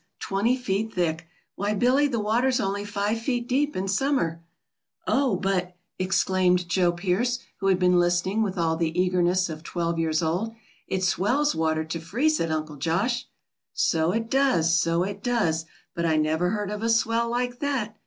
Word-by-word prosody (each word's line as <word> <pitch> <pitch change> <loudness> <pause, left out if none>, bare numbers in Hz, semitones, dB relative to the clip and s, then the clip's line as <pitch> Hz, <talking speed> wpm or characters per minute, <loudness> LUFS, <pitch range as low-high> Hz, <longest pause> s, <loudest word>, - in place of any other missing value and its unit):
Twenty 220 +6 0
feet 220 -2 -2
thick! 165 -2 -1 0.3
Why, 205 +2 -1
Billy, 255 +7 +3
the 240 -5 -2
water's 245 +5 +1
only 200 -2 -1
five 205 +2 -1
feet 240 0 -2
deep 285 +4 0
in 190 +1 -2
summer." 195 - 0 0.6
"Oh, 265 -6 +2
but," 180 -1 -1 0.2
exclaimed 185 -1 +2
Joe 175 -1 +2
Pearce, 195 +8 0 0.2
who 195 - -1
had 190 -2 +4
been 180 -1 +3
listening 175 +4 +1
with 195 -3 -1
all 165 -1 +1
the 165 +1 -1
eagerness 180 0 +2
of 155 -2 -7
twelve 170 0 -2
years 160 0 0
old, 185 +8 -1 0.3
"it 190 0 -2
swells 245 - +1
water 160 -1 0
to 165 +1 -5
freeze 245 - 0
it, 165 - -1
Uncle 155 -1 -3
Josh." 200 - -1 0.5
"So 160 +1 +2
it 225 +3 -1
does, 180 -12 +3
so 170 +1 +2
it 200 +1 -5
does. 180 -10 0 0.3
But 170 0 -1
I 160 - +2
never 160 +3 +1
heard 205 0 -2
of 210 0 -4
a 230 - 0
swell 230 +1 +2
like 245 +1 -2
that." 255 -7 -2
190 Hz, 175 wpm, -25 LUFS, 170-230 Hz, 0.6 s, had